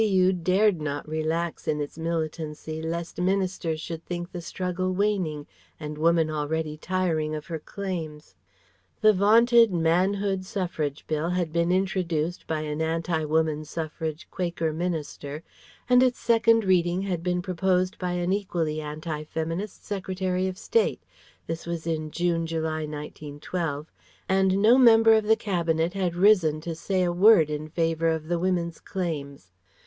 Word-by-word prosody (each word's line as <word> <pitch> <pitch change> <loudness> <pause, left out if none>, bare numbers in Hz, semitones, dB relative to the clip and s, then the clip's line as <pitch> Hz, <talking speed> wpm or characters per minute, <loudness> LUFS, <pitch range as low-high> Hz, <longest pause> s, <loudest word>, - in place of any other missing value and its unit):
U. 190 -3 +3
dared 185 +1 +2
not 145 -1 -3
relax 160 +2 -2
in 150 - 0
its 145 -1 -4
militancy 160 -1 -4
lest 170 +2 -4
Ministers 185 -4 0
should 165 +1 -6
think 175 0 -5
the 175 - -6
struggle 185 +1 -2
waning 185 -7 0 0.3
and 150 -1 -5
Woman 165 +1 +3
already 155 +1 -2
tiring 160 -2 -1
of 150 - -6
her 165 -2 -5
claims. 160 -4 -6 0.7
The 215 -1 +6
vaunted 230 +3 +5
Manhood 185 +3 +1
Suffrage 170 -7 -3
Bill 155 +2 -1
had 175 -3 -1
been 170 +1 +2
introduced 180 -3 -1
by 155 -1 -1
an 150 0 -3
anti 165 0 -1
woman 155 0 +1
suffrage 160 0 -5
Quaker 170 -3 -2
Minister 155 -3 -4 0.4
and 250 0 +6
its 255 -1 +3
Second 230 -1 +3
reading 185 0 +1
been 180 0 -1
proposed 185 0 0
by 180 -1 -2
an 180 +1 0
equally 170 -6 -1
anti 155 +1 -5
feminist 165 +6 -4
Secretary 185 -2 -2
of 185 0 -5
State 460 - 0 0.4
this 165 +1 -5
was 170 -1 -4
in 155 -2 -2
June 170 0 0
July, 160 -1 -2
1912; 150 +1 -5 0.4
and 190 0 +3
no 240 +4 +7
member 225 -2 +7
of 220 -1 +3
the 220 +1 +5
Cabinet 170 -5 0
had 185 -3 -1
risen 180 -5 +4
to 165 +1 -5
say 185 +3 -1
a 175 - +1
word 180 -4 +6
in 150 +1 -4
favour 165 0 0
of 160 -1 -1
the 175 -1 +1
Women's 175 -2 -1
claims. 140 - -5
170 Hz, 150 wpm, -26 LUFS, 155-185 Hz, 0.7 s, no